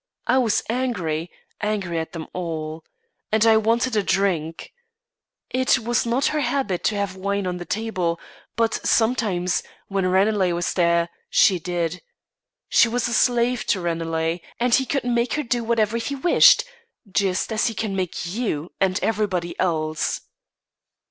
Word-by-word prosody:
I 255 +2 +3
was 230 -5 +1
angry; 185 -10 -2 0.3
angry 200 -6 -1
at 160 - -5
them 165 -2 -6
all, 160 -3 -4 0.5
and 220 +1 +3
I 225 -1 +6
wanted 230 +2 +1
a 210 - +3
drink. 185 - -1 0.8
It 260 +1 +3
was 240 -1 0
not 245 +4 +1
her 305 - +1
habit 250 -8 -1
to 215 - +2
have 200 -2 -2
wine 200 +1 -2
on 180 -1 -2
the 175 - -7
table; 185 -7 -2 0.4
but 225 -1 +1
sometimes, 210 -6 +1 0.3
when 195 -2 0
Ranelagh 190 -1 +2
was 175 +1 -1
there, 170 -1 +2 0.2
she 185 -3 +4
did. 175 0 -3 0.7
She - - +5
was 240 +1 -1
a 240 - -2
slave 240 0 +2
to 190 - +2
Ranelagh, 165 -1 -1 0.2
and 245 0 +1
he 265 0 +3
could 275 - -1
make 235 -1 0
her 300 - -1
do 240 -1 -1
whatever 225 -1 +1
he 235 +5 -3
wished, 280 +6 +6 0.4
just 195 +2 0
as 215 - +1
he 225 - -3
can 215 -3 -2
make 185 -2 -3
you 175 -5 -3
and 185 -1 +2
everybody 190 -6 -1
else." 155 -3 -1
200 Hz, 155 wpm, -23 LUFS, 175-235 Hz, 0.8 s, I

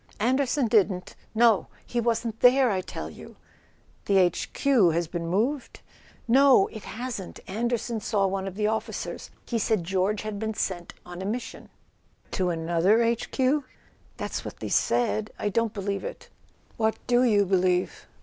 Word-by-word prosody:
"Anderson 260 +4 +1
didn't? 195 -5 +1 0.2
No. 225 -6 +4 0.2
He 240 - -1
wasn't 230 -1 -1
there, 255 -1 +5
I 190 -2 0
tell - - -6
you - - -12 0.3
!" - - -35
"The 200 - +4
H. 180 -2 +2
Q. 255 -10 +3
has 170 +1 0
been 170 0 -4
moved?" 235 - -1 0.5
"No, 260 -3 +6
it 220 - -9
hasn't. 225 -4 -6
Anderson 235 +2 -2
saw 205 -2 0
one 195 0 -2
of 190 - -6
the 210 +1 -1
officers. 220 +1 -3 0.2
He 235 - -1
said 215 -3 +1
George 190 +4 0
had 215 -1 -4
been 220 0 -3
sent 175 -4 -3
on 180 +1 -8
a - - -4
mission." 235 +5 -5 0.6
"To 185 -1 0
another 170 +6 +2
H. 230 0 0
Q.?" 270 +2 +1 0.5
"That's - - -4
what - - -8
they - - -5
said. 215 -3 +1
I 205 - -1
don't 230 +1 0
believe 200 -1 -3
it." - - -8 0.5
"What 220 -1 +1
do 245 0 +3
you 210 -5 +4
believe?" 185 -1 0
215 Hz, 165 wpm, -26 LUFS, 190-240 Hz, 0.6 s, No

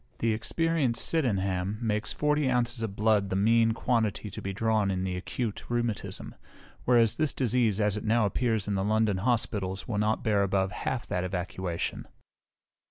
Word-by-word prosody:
The 115 -1 +1
experienced 130 +2 0
Sydenham 100 - 0
makes 110 -2 -1
forty 150 -2 +1
ounces 120 -1 0
of 110 -3 -3
blood 105 -2 +2
the 95 - -1
mean 115 +3 +4
quantity 110 -3 0
to - - -7
be 95 - -3
drawn 110 0 +1
in 95 -1 -1
the 95 -1 -2
acute 105 +4 -4
rheumatism; 120 -3 -2 0.5
whereas 120 -3 +4
this 155 -2 +1
disease, 120 -4 +1
as 105 -1 +1
it 105 - -5
now 110 0 +3
appears 110 0 0
in 105 - 0
the 95 -1 0
London 110 -1 +2
hospitals, 100 -3 -1
will 105 -3 -1
not 105 +1 +1
bear 105 -3 +2
above 95 -1 +1
half 125 +5 -3
that 90 - -2
evacuation. 90 -1 -3
110 Hz, 165 wpm, -28 LUFS, 100-120 Hz, 0.5 s, mean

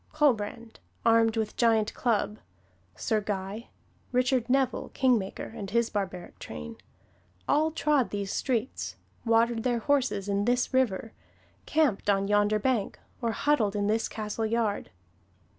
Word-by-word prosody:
Colbrand, 235 -6 0 0.3
armed 225 0 +4
with 220 -1 -1
giant 225 -3 +2
club; 215 -3 0 0.6
Sir 215 - 0
Guy; 200 +2 -4 0.4
Richard 250 -1 +1
Neville, 265 0 +1
kingmaker, 240 -7 +1
and 200 -4 -6
his 235 +2 +1
barbaric 190 -4 -4
train, 75 0 -8 0.7
all 310 +2 +3
trod 300 -5 +1
these 200 -1 -3
streets, 255 -1 -2 0.3
watered 230 0 +3
their 245 0 +1
horses 250 -6 0
in 200 0 0
this 245 +2 +1
river, 225 -4 +1 0.5
camped 295 -10 +1
on 195 0 +2
yonder 205 +1 +3
bank, 220 -1 0 0.2
or 230 -2 0
huddled 225 -9 +1
in 205 -1 0
this 220 +2 +1
castle 220 +1 -3
yard. 220 -2 -1
225 Hz, 130 wpm, -28 LUFS, 205-250 Hz, 0.7 s, armed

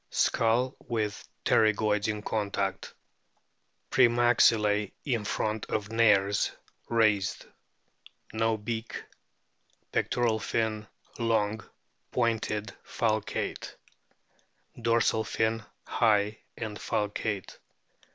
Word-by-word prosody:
Skull 120 +3 +2
with 110 -3 -2 0.2
pterygoids 105 -1 +3
in 105 -1 -2
contact; 100 -3 -2 1.0
pre 125 -2 +6
maxillae 110 -4 +3
in 120 -7 0
front 110 +1 -2
of 105 0 -3
nares 105 -3 +3 0.4
raised. 105 -4 +2 0.9
No 115 0 +1
beak. 110 +2 -5 0.9
Pectoral 115 -3 +1
fin 110 -1 -1 0.3
long, 110 -2 +1 0.5
pointed, 110 -4 -1
falcate; 110 -2 -2 1.1
dorsal 115 -1 +2
fin 110 0 -1 0.2
high 105 -2 +2 0.2
and 110 -2 -5
falcate. 105 -1 -2
110 Hz, 80 wpm, -29 LUFS, 105-115 Hz, 1.1 s, pre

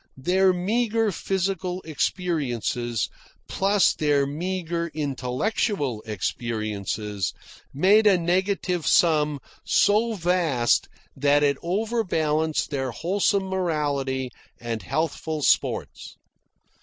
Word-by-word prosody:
Their 185 +7 +3
meagre 220 +4 0
physical 185 -1 -2
experiences, 135 - -1 0.4
plus 195 0 +2
their 145 -2 +2
meagre 170 +2 -3
intellectual 140 - -1
experiences, 105 -2 -3 0.4
made 205 +9 +4
a 195 -3 +6
negative 180 0 0
sum 150 -4 +3 0.2
so 220 +3 +3
vast 170 - +1 0.3
that 145 +1 +3
it 140 -1 +2
overbalanced 170 -7 0
their 135 -2 -1
wholesome 195 - 0
morality 145 -8 -1 0.3
and 115 -2 -4
healthful 155 -1 -2
sports. - - 0
160 Hz, 85 wpm, -24 LUFS, 135-190 Hz, 0.4 s, a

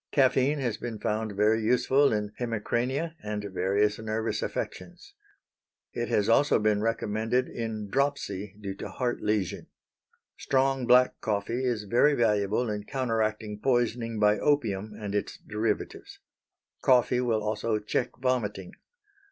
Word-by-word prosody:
Caffeine 135 +1 +3
has 120 -6 -2
been 115 -1 -5
found 110 0 -2
very 105 +3 +2
useful 130 +4 +3
in 105 -1 -1
hemicrania 125 +7 -1
and 105 0 -4
various 100 +4 +1
nervous 110 +1 -2
affections. - - -6 0.8
It - - -2
has 105 - +1
also 140 +6 +4
been 105 -1 +1
recommended 115 +2 0
in 110 -3 -4
dropsy 105 -6 -2
due 100 -2 -5
to - - -6
heart 125 -2 -2
lesion. 105 -5 -1 0.7
Strong, 135 -1 +1
black 125 +1 +4
coffee 110 +4 -1
is 120 -4 0
very 120 +8 +3
valuable 105 0 +1
in 105 -1 -3
counteracting 110 -5 -2
poisoning 120 -2 0
by 105 -1 +3
opium 110 -8 0
and 105 -2 -5
its 105 - -2
derivatives. 105 0 -3 0.6
Coffee 125 -1 +4
will 115 -4 0
also 110 +1 -1
check 105 +4 -1
vomiting. 105 -8 -1
110 Hz, 130 wpm, -28 LUFS, 105-125 Hz, 0.8 s, also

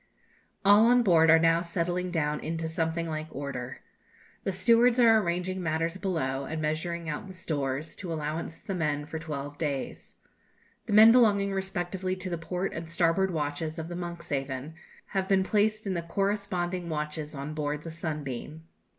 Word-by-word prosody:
All 205 +3 +7
on 245 0 +5
board 165 -5 +5
are 165 - +8
now 165 +1 +4
settling 175 +1 -2
down 150 -3 0
into 165 0 -3
something 165 +1 -1
like 155 -1 -4
order. 130 -3 -6 0.6
The 195 - +1
stewards 235 +5 +4
are 225 -2 +7
arranging 180 0 -2
matters 165 +1 -1
below, 140 -9 -2
and 160 +3 -4
measuring 160 +2 -2
out 155 +5 -4
the 190 - -10
stores, 150 -3 -3
to 180 -4 -6
allowance 160 +1 -3
the 195 - -6
men 150 -4 -1
for 160 +1 -5
twelve 145 -3 -6
days. 140 -4 -4 0.7
The - - -1
men 220 +2 +9
belonging 205 -5 +4
respectively 190 -1 -2
to 185 0 -5
the 170 - -2
port 180 +3 -3
and 165 0 -6
starboard 170 +3 +2
watches 155 0 -3
of 160 +1 -5
the 175 - -5
'Monkshaven' 150 -5 -4 0.4
have 190 -1 -1
been 190 -1 +3
placed 215 +2 +1
in 195 - -1
the 170 - -1
corresponding 185 -1 -2
watches 150 0 -4
on 140 +2 -5
board 150 -1 -2
the 165 - -6
'Sunbeam.' 155 -2 -5
165 Hz, 170 wpm, -28 LUFS, 155-190 Hz, 0.7 s, men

